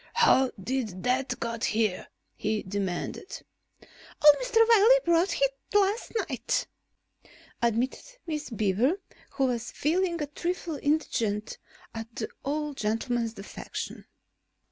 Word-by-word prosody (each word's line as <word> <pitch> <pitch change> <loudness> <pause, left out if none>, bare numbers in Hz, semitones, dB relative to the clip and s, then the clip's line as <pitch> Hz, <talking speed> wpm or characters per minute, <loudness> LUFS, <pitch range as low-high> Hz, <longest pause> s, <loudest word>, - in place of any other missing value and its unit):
"How 265 - +5
did 215 -4 -3
that 250 0 0
get 230 -1 -3
here?" 215 -4 0 0.3
he 215 0 -1
demanded. 195 - -4 0.3
"Old 295 -1 +3
Mr. 455 -2 +4
Wiley 460 +2 +7
brought 340 +2 +2
it 275 -1 +3 0.2
last 410 +3 +2 0.2
night," 250 -5 -1 1.0
admitted 245 - -1
Miss 305 -3 -4
Beaver, 220 - +1 0.4
who 270 - +1
was 240 -2 -1
feeling 340 +3 0
a 300 - -1
trifle 335 +2 -3
indignant 230 -9 -1 0.3
at 225 0 -7
the 220 - -3
old 295 0 -2
gentleman's 225 +1 -1
defection. 195 0 -7
260 Hz, 115 wpm, -28 LUFS, 225-330 Hz, 1.0 s, Wiley